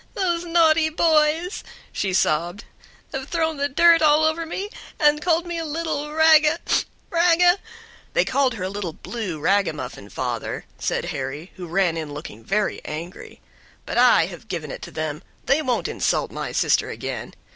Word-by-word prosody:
"Those 345 -3 0
naughty 325 -2 +4
boys," 320 +3 +2 0.3
she 195 - -2
sobbed, 175 +3 0 0.5
"have 270 +1 -5
thrown 320 -2 0
the 285 +1 0
dirt 335 +3 +5
all 305 0 +5
over 325 +1 0
me, 395 +5 -4 0.3
and 295 0 +4
called 340 +1 +1
me 345 -1 -4
a - - -3
little 305 -1 -3
raga 315 0 +5 0.5
raga 350 +2 +4 0.3
" 470 +1 -25
"They - - +4
called 260 -2 +1
her 190 - -5
a 185 - -2
little 195 -4 -4
'blue' 190 -4 -5
ragamuffin, 155 - -1
father," - - -4
said - - -1
Harry, 150 +7 -5
who 180 -2 -8
ran 170 -1 +1
in 150 -3 -5
looking 115 -7 -9
very 210 - -1
angry; 165 +4 -8 0.4
"but - - -1
I 245 -9 +6
have 175 +4 -10
given 165 -7 -5
it - - -7
to - - -8
them; 155 0 -4 0.2
they 275 +4 +3
won't 255 -5 -1
insult - - -1
my - - -5
sister - - +2
again. - - -6
285 Hz, 165 wpm, -23 LUFS, -, 0.5 s, I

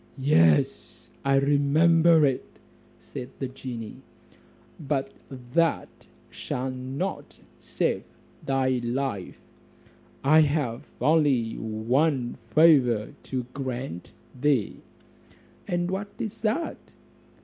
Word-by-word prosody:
"Yes, 85 - +2
I 135 0 +2
remember 155 +4 +4
it," 135 -2 -2 0.4
said 125 - -8
the 135 - -3
genie, 125 -4 -7 0.8
"but 140 -3 -2 0.4
that 165 0 0 0.2
shall 130 +1 -4
not 130 +9 -5 0.2
save - - -1 0.4
thy 130 -2 0
life: 120 -6 -3 0.9
I 155 +3 +6
have 145 -6 -1
only 145 -7 +2
one 120 +5 0
favour 125 -6 +4 0.2
to 130 -2 -2
grant 130 -9 -5 0.3
thee." 140 -7 +1 0.9
"And 175 0 -1
what 195 +2 -3
is 220 -4 -5
that?" 230 +10 -1
135 Hz, 90 wpm, -26 LUFS, 125-155 Hz, 0.9 s, I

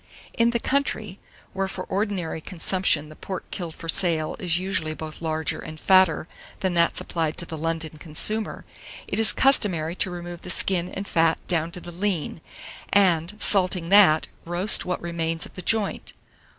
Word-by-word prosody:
791. 230 - +2
IN 235 - +4
THE 235 0 -1
COUNTRY, 220 -8 -2 0.3
where 195 0 -2
for 185 -1 -6
ordinary 190 -6 -3
consumption 165 -3 0
the 155 - -13
pork 190 +2 -8
killed 170 -4 -6
for 165 - -10
sale 165 -2 +1
is 175 -5 0
usually 180 -4 -2
both 155 0 -8
larger 160 -2 -2
and 155 0 -9
fatter 185 -4 +3 0.3
than 185 -2 0
that 170 -1 +2
supplied 160 -2 -2
to 175 - -2
the 165 - -7
London 160 0 -4
consumer, 210 +8 -1 0.4
it - - 0
is 225 - +6
customary 185 - +2
to 190 - +1
remove 175 -1 -8
the - - -9
skin 180 -1 +1
and 195 +1 -6
fat 165 -1 +2
down 165 -2 0
to - - -3
the 175 - -10
lean, 175 -3 -3 0.5
and, 185 -1 +2
salting 180 -5 +4
that, 190 -6 +6 0.2
roast 175 +5 +5
what 180 - -2
remains 165 -1 -2
of - - -15
the 180 - -7
joint. 210 +1 0
175 Hz, 175 wpm, -24 LUFS, 160-195 Hz, 0.5 s, is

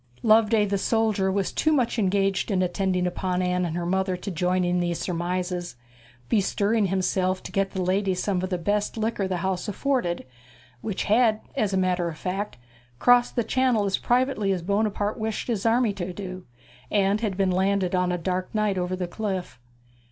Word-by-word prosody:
Loveday 220 -1 +5
the 200 -1 -1
soldier 215 -2 +1
was 195 -1 0
too 315 - +1
much 250 -5 +1
engaged 195 0 +1
in 190 -3 +2
attending 180 0 0
upon 180 0 -1
Anne 180 0 +1
and 170 0 -3
her 175 - -2
mother 190 +1 0
to 195 +2 -5
join 180 +1 +1
in 175 0 +1
these 175 -1 -1
surmises, 180 -2 -3 0.5
bestirring 205 - +1
himself 185 0 0
to - - -7
get 195 0 0
the 190 -1 -3
ladies 190 0 0
some 190 -3 0
of 185 - -3
the 180 - -1
best 205 +5 -1
liquor 220 -3 -1
the 185 -1 -1
house 190 0 -1
afforded, 210 -5 -1 0.6
which 205 -3 -2
had, 220 0 +3 0.2
as 210 -2 +1
a 190 - +1
matter 180 -2 +1
of 160 - -8
fact, 195 +2 -3 0.4
crossed 245 - +4
the 240 - +2
Channel 245 -2 +2
as 195 -1 0
privately 245 -5 +1
as 180 -3 -1
Buonaparte 205 +2 0
wished 220 0 -3
his 230 -3 0
army 230 -2 +3
to 185 -2 -4
do, 185 -1 -7 0.4
and 200 +1 +2
had 205 -5 -2
been 195 -2 +2
landed 190 0 +1
on 180 -1 +2
a 180 - 0
dark 185 +1 -2
night 210 -3 +1
over 180 +1 -1
the 180 -1 -3
cliff. 190 - -4
190 Hz, 190 wpm, -25 LUFS, 180-215 Hz, 0.6 s, Loveday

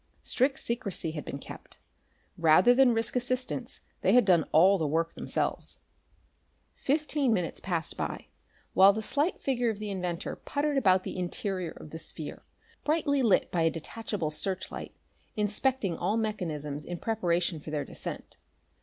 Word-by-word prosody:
Strict 270 +2 +1
secrecy 210 -9 -1
had 155 -2 -6
been - - -5
kept. - - -10 0.6
Rather 170 +8 +6
than 260 0 +5
risk 225 +1 -1
assistants 250 0 -2 0.2
they 190 - +3
had 250 -3 +6
done 175 -5 +4
all 185 +5 +6
the 155 - 0
work 165 +3 0
themselves. - - -2 1.0
Fifteen 295 -2 0
minutes 180 -5 -1
passed 170 -4 -2
by, - - -4 0.5
while 195 +1 +7
the 220 +1 -3
slight 290 - 0
figure 245 -3 0
of 220 - -2
the 210 0 -4
inventor 180 -3 -3
puttered 290 0 -1
about 190 -5 +4
the - - -5
interior 180 0 -2
of 150 - -11
the 160 - -6
sphere, 155 -2 -1 0.4
brightly 295 -3 +1
lit 225 -6 +3
by 170 - +1
a 165 - +4
detachable 170 0 -4
searchlight, 190 +4 -2 0.4
inspecting 210 -1 +1
all 200 +6 0
mechanisms 155 -10 -3
in 175 - -5
preparation 175 -6 0
for 150 - -9
their 150 -2 -2
descent. - - -7
195 Hz, 155 wpm, -29 LUFS, 165-245 Hz, 1.0 s, while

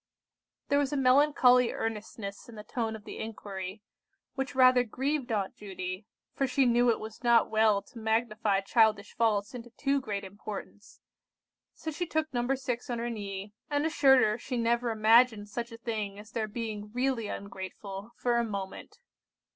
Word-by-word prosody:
There 285 - +4
was 285 -1 0
a 290 - 0
melancholy 255 -2 +5
earnestness 215 -2 -5
in 230 - -11
the 210 - -8
tone 225 0 -3
of 215 - -10
the - - -8
inquiry, 200 -2 -6 0.5
which 270 -1 -4
rather 255 -1 +6
grieved 265 +3 -2
Aunt 200 -3 -1
Judy, 185 0 -6 0.3
for 270 - 0
she 265 +1 +2
knew 240 0 +4
it 230 - +2
was 220 +2 -9
not 235 -2 +4
well 215 -2 +3
to 230 - -13
magnify 220 -2 +1
childish 215 -1 +2
faults 215 -2 +1
into 240 -1 -8
too 275 +3 0
great 205 -5 -4
importance: 205 +1 -9 0.8
so 315 - -5
she 350 +3 -3
took 315 -2 -1
No. 245 +2 +1
6 250 -2 -4
on 240 - -1
her 235 +1 -2
knee, 200 -2 -6 0.2
and 290 0 +1
assured 275 -5 +5
her 215 +2 +1
she 255 - -4
never 235 +1 +1
imagined 220 -1 +4
such 235 +2 -4
a 230 - -8
thing 215 -4 -4
as 210 +1 -12
their 220 -2 -2
being 210 -1 -5
really 250 -3 0
ungrateful, 195 +1 -7
for 240 -1 +1
a 235 - +2
moment. 200 -4 -6
230 Hz, 170 wpm, -30 LUFS, 210-250 Hz, 0.8 s, rather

